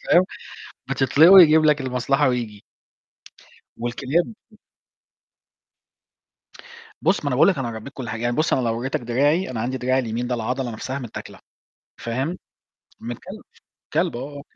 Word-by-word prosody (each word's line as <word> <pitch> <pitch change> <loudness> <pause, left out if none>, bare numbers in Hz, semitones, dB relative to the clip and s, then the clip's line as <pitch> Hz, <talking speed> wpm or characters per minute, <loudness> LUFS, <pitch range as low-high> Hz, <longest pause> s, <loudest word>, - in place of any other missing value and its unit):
فاهم، 180 +1 +5 0.7
بتِطلقه، 145 +6 +5
ويجيب 160 -5 +8
لَك 150 -1 +3
المصلحة 130 +2 +1
وييجي. 115 -5 -3 1.2
والكلاب 130 - -1 2.7
بُص، 200 - +2
ما - - -3
أنا 125 - 0
باقول - - +5
لك 195 - +2
أنا 130 -3 -2
ربيت 110 +5 -8
كل 130 -5 -7
حاجة. 115 - -5
يعني 120 0 0
بُص، 155 - +1
أنا 130 - +2
لو 115 -1 -1
وريتك 130 +2 -2
دراعي، 140 +8 +1
أنا 115 - -4
عندي 130 +3 -2
دراعي 130 +1 +1
اليمين 120 0 -3
ده 125 - -1
العضلة 125 +2 -3
نفسها 130 +5 -5
متآكلة، 120 -4 -9 0.6
فاهم، 130 +10 -3 0.6
من 120 +1 -5
كلب. - - -11 0.5
كلب - - +1
آه، 120 - -4 0.2
آه، - - -8
130 Hz, 150 wpm, -22 LUFS, 120-145 Hz, 2.7 s, ويجيب